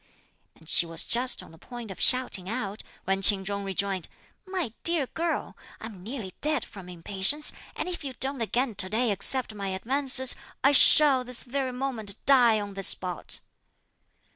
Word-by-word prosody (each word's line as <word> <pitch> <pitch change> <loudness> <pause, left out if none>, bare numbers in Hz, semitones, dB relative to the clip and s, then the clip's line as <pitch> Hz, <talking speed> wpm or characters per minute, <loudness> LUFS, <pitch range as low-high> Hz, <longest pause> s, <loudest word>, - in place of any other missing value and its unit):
and 160 - -21
she 170 - +5
was 165 -1 -3
just 250 +2 +1
on - - -16
the 165 - -18
point 240 0 -10
of 190 - -11
shouting 245 -7 +3
out, 215 -3 -5 0.2
when 195 +1 -2
Ch'in 195 0 +4
Chung 200 0 -4
rejoined: 195 -2 -3 0.4
"My 360 - -4
dear 335 -4 +2
girl! 330 +5 -4 0.2
I'm 220 -5 -10
nearly 210 -3 -8
dead 300 -4 0
from 190 -4 -13
impatience, 195 - +2 0.2
and - - -5
if 350 -3 -5
you 270 -2 -6
don't 270 -1 -2
again 235 +3 -2
to 185 -1 -5
day 225 +2 -1
accept 220 +4 0
my 200 -2 -6
advances, 260 +6 +3 0.3
I 275 - +5
shall 280 -1 +6
this 250 -1 -7
very 265 0 -4
moment 245 -6 -5
die 245 -5 +4
on 205 -1 -7
this 195 -1 +1
spot." 180 -2 -1
230 Hz, 170 wpm, -26 LUFS, 195-265 Hz, 0.4 s, shall